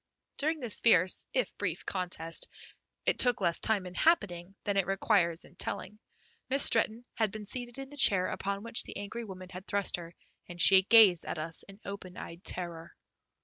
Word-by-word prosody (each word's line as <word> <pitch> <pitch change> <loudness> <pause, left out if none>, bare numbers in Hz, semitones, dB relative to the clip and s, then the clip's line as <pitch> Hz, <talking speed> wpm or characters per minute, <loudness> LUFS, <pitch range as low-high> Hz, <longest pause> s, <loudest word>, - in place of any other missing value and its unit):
During 310 +2 0
this 235 -4 -3
fierce 185 -5 +4
if 255 - -1
brief 180 -4 -3
contest, 175 -3 -1 0.6
it - - +1
took 245 -2 +4
less 170 -1 0
time 210 -4 0
in 180 - -8
happening 195 - +1
than 205 - -1
it 195 -2 +1
requires 175 -3 +1
in - - -18
telling, 210 +3 -4 0.5
Miss 275 +2 +4
Stretton 225 +1 +2
had 220 -3 0
been 215 0 -7
seated 240 +3 -6
in 270 0 -7
the 290 - -11
chair 195 -8 +4
upon 200 +2 -3
which 230 0 +1
the - - -8
angry 205 +4 -6
woman 185 -2 -9
had 185 +1 -10
thrust 200 -3 0
her, 170 -1 -10 0.3
and 175 0 -9
she 190 +1 +8
gazed 200 -4 +6
at - - -5
us 160 +1 -5
in 195 +1 -13
open 195 -2 -8
eyed 170 +3 -9
terror. 170 -2 -6
195 Hz, 190 wpm, -30 LUFS, 180-225 Hz, 0.6 s, she